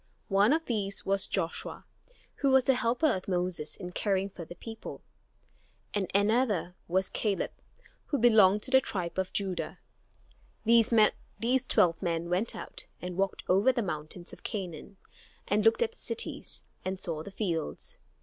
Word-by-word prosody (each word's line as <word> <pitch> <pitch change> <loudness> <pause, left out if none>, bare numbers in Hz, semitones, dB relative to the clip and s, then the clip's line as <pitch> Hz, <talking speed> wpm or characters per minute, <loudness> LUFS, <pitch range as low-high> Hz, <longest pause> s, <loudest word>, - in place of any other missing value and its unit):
One 200 +4 +4
of 320 +2 +2
these 200 -4 -2
was 195 0 +2
Joshua, 170 -4 -3 0.5
who 275 - +2
was 265 -1 +6
the 265 - +4
helper 245 +3 +1
of 185 - -6
Moses 180 -4 -2
in 180 - -7
caring 195 +1 0
for 175 - -8
the 175 - -10
people, 225 +5 -8 0.9
and 200 -3 -1
another 205 -3 +2
was 190 +2 +1
Caleb, 205 -3 -1 0.6
who 285 - 0
belonged 215 -4 +6
to 260 - 0
the 265 0 +7
tribe 185 -6 -3
of 190 -1 -1
Judah. 190 -3 -2 0.9
These 230 +2 +3
twelve 180 -6 +3
men 170 -1 -1
went 190 +6 0
out - - -6
and 180 0 -5
walked 195 0 -1
over 195 +8 +5
the 240 -2 -1
mountains 165 +1 -4
of - - -12
Canaan 190 -2 -5 0.5
and 205 +1 +2
looked 225 - +5
at 465 - -2
the 465 - -15
cities 460 0 -3 0.2
and 190 0 -3
saw 165 -4 -3
the 180 - -7
fields. 185 -5 -3
200 Hz, 160 wpm, -30 LUFS, 180-230 Hz, 0.9 s, the